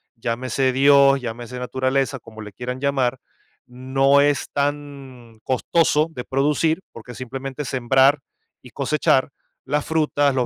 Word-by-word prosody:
llámese 130 Hz, +3 st, -1 dB
Dios, 140 Hz, 0 st, +5 dB
llámese 120 Hz, +1 st, -6 dB
naturaleza, 130 Hz, +2 st, -1 dB
como 110 Hz, -1 st, -12 dB
le 105 Hz, -1 st, -10 dB
quieran 125 Hz, +3 st, -5 dB
llamar?, 135 Hz, -3 st, 0 dB, 0.5 s
no 135 Hz, +3 st, +2 dB
es 145 Hz, -1 st, +1 dB
tan 140 Hz, -5 st, -5 dB
costoso 150 Hz, +4 st, +1 dB
de 125 Hz, -5 st, -7 dB
producir, 150 Hz, +5 st, +1 dB
porque 115 Hz, +1 st, -11 dB
simplemente 135 Hz, +3 st, -6 dB
sembrar 135 Hz, +3 st, +3 dB, 0.4 s
y 125 Hz, -, -14 dB
cosechar 140 Hz, +1 st, +1 dB, 0.4 s
las 145 Hz, +2 st, -1 dB
frutas, 145 Hz, -3 st, +1 dB
los 125 Hz, -2 st, +1 dB
135 Hz, 125 wpm, -21 LUFS, 125-140 Hz, 0.5 s, Dios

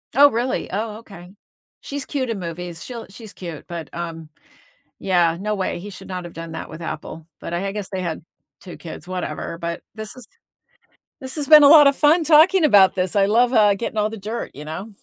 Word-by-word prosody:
Oh, 285 Hz, +1 st, +8 dB
really? 240 Hz, +3 st, -2 dB
Oh, 215 Hz, +2 st, -3 dB
okay. 190 Hz, -4 st, -13 dB, 0.5 s
She's 285 Hz, -1 st, -6 dB
cute 260 Hz, -4 st, -3 dB
in 215 Hz, -4 st, -3 dB
movies. 170 Hz, 0 st, -7 dB
She'll 235 Hz, -3 st, -8 dB
she's 215 Hz, +1 st, -12 dB
cute. 170 Hz, -5 st, -8 dB
But, 170 Hz, -2 st, -7 dB
um, 165 Hz, -2 st, -6 dB, 0.7 s
yeah, 175 Hz, -3 st, +2 dB
no 210 Hz, +1 st, -1 dB
way. 190 Hz, -3 st, -2 dB
He 205 Hz, +4 st, -8 dB
should 190 Hz, -, -12 dB
not 180 Hz, -1 st, -5 dB
have 175 Hz, -, -10 dB
done 165 Hz, 0 st, -8 dB
that 160 Hz, -, -6 dB
with 160 Hz, +2 st, -10 dB
Apple. 160 Hz, 0 st, -7 dB
But 170 Hz, -, -5 dB
I 185 Hz, +3 st, -2 dB
I 195 Hz, -, -3 dB
guess 205 Hz, -2 st, -5 dB
they 190 Hz, -1 st, -3 dB
had 165 Hz, -3 st, -4 dB, 0.4 s
2 180 Hz, -, -10 dB
kids, 170 Hz, +1 st, -10 dB
whatever, 170 Hz, -2 st, -5 dB
but 170 Hz, 0 st, -5 dB
this 215 Hz, -1 st, -7 dB
has 255 Hz, -3 st, -13 dB, 1.0 s
this 260 Hz, +2 st, -6 dB
has 290 Hz, -3 st, -3 dB
been 305 Hz, -1 st, +9 dB
a -, -, +9 dB
lot 295 Hz, -2 st, +9 dB
of 280 Hz, -, +3 dB
fun 315 Hz, +3 st, +4 dB
talking 325 Hz, +4 st, +5 dB
about 200 Hz, -8 st, +6 dB
this, 185 Hz, +1 st, -1 dB
I 195 Hz, -1 st, +4 dB
love, 240 Hz, +4 st, +3 dB
uh, 210 Hz, -3 st, +5 dB
getting 220 Hz, +1 st, -5 dB
all 210 Hz, 0 st, +1 dB
the 225 Hz, -, -8 dB
dirt, 215 Hz, +4 st, -5 dB
you 150 Hz, +1 st, -10 dB
know? 160 Hz, +8 st, -6 dB
195 Hz, 220 wpm, -21 LUFS, 170-235 Hz, 1.0 s, been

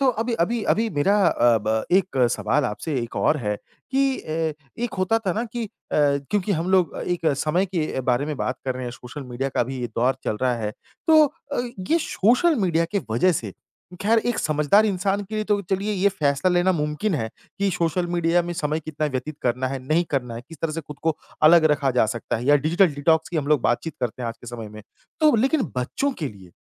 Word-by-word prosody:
तो 275 Hz, -, +3 dB
अभी 235 Hz, +2 st, -1 dB
अभी 225 Hz, +5 st, 0 dB
अभी 225 Hz, +1 st, 0 dB
मेरा 195 Hz, +7 st, +2 dB
अ, 120 Hz, -1 st, +3 dB
ब 110 Hz, 0 st, 0 dB
एक 190 Hz, -7 st, 0 dB
सवाल 115 Hz, +7 st, +1 dB
आपसे 130 Hz, +7 st, -3 dB
एक 115 Hz, -, -7 dB
और 155 Hz, -, +2 dB
है 105 Hz, -7 st, -2 dB, 0.3 s
कि 270 Hz, 0 st, +2 dB
अ, -, -, -9 dB, 0.5 s
एक 240 Hz, -, -2 dB
होता 185 Hz, +5 st, +2 dB
था 185 Hz, -, +2 dB
ना 225 Hz, +6 st, -1 dB
कि 235 Hz, 0 st, -4 dB
अ, 215 Hz, -, -7 dB, 0.3 s
क्योंकि 145 Hz, +8 st, +1 dB
हम 170 Hz, +1 st, -1 dB
लोग 185 Hz, -5 st, +2 dB
एक 175 Hz, -2 st, -1 dB
समय 170 Hz, +7 st, +1 dB
के 165 Hz, -7 st, -2 dB
बारे 125 Hz, +2 st, +1 dB
में 150 Hz, -1 st, -3 dB
बात 130 Hz, -, -2 dB
कर 130 Hz, -1 st, -1 dB
रहे 130 Hz, 0 st, -5 dB
हैं, 120 Hz, -, -4 dB
सोशल 125 Hz, +4 st, -9 dB
मीडिया 130 Hz, +3 st, -2 dB
का -, -, +3 dB
भी 130 Hz, +1 st, -5 dB
ये 120 Hz, -, -1 dB
दौर 125 Hz, +3 st, +2 dB
चल 105 Hz, -, -1 dB
रहा 125 Hz, -1 st, +2 dB
है, 105 Hz, -2 st, -3 dB, 0.3 s
तो 315 Hz, -1 st, +7 dB, 0.3 s
अ, 285 Hz, -, 0 dB, 0.3 s
ये 330 Hz, -, +5 dB
सोशल 255 Hz, -, +3 dB
मीडिया 170 Hz, -1 st, +2 dB
के 205 Hz, -, +2 dB
वज़ह 120 Hz, +12 st, +3 dB
से 110 Hz, -, -3 dB, 0.5 s
ख़ैर 225 Hz, +3 st, +4 dB
एक 240 Hz, -2 st, 0 dB
समझदार 155 Hz, +8 st, +3 dB
इंसान 195 Hz, 0 st, 0 dB
के 205 Hz, +2 st, -8 dB
लिए 215 Hz, 0 st, -1 dB
तो 210 Hz, -1 st, +1 dB
चलिए 195 Hz, +2 st, 0 dB
ये 200 Hz, 0 st, +3 dB
फैसला 145 Hz, -2 st, +1 dB
लेना 175 Hz, +1 st, +3 dB
मुमकिन 150 Hz, +5 st, -1 dB
है 110 Hz, -7 st, -2 dB, 0.3 s
कि 200 Hz, 0 st, +1 dB
सोशल 175 Hz, 0 st, 0 dB
मीडिया 170 Hz, 0 st, +2 dB
में 175 Hz, 0 st, -4 dB
समय 155 Hz, -2 st, -1 dB
कितना 155 Hz, 0 st, -3 dB
व्यतीत 140 Hz, +2 st, -4 dB
करना 125 Hz, +1 st, 0 dB
है, 135 Hz, -, -3 dB
नहीं 165 Hz, +3 st, +3 dB
करना 125 Hz, -4 st, -2 dB
है, 115 Hz, -, -6 dB
किस 165 Hz, -2 st, -12 dB
तरह 160 Hz, -, 0 dB
से 165 Hz, -, -3 dB
खुद 150 Hz, -1 st, -11 dB
को 160 Hz, -2 st, +1 dB, 0.3 s
अलग 160 Hz, +1 st, +7 dB
रखा 145 Hz, -2 st, +1 dB
जा 110 Hz, -, +4 dB
सकता 115 Hz, +2 st, -3 dB
है 115 Hz, -, -5 dB
या 145 Hz, +1 st, +6 dB
डिजिटल 165 Hz, +7 st, +3 dB
डिटॉक्स 160 Hz, +3 st, +2 dB
की 175 Hz, -, -4 dB
हम 150 Hz, -3 st, -1 dB
लोग 150 Hz, -3 st, +4 dB
बातचीत 155 Hz, +7 st, 0 dB
करते 125 Hz, 0 st, -3 dB
हैं 120 Hz, -, -2 dB
आज 115 Hz, -, -6 dB
के -, -, -13 dB
समय 115 Hz, -2 st, -7 dB
में, 105 Hz, 0 st, -11 dB, 0.4 s
तो 305 Hz, -3 st, +5 dB
लेकिन 270 Hz, +6 st, +2 dB
बच्चों 130 Hz, -, -1 dB
के 150 Hz, -, -2 dB
लिए 95 Hz, -5 st, -14 dB
155 Hz, 230 wpm, -23 LUFS, 130-195 Hz, 0.5 s, तो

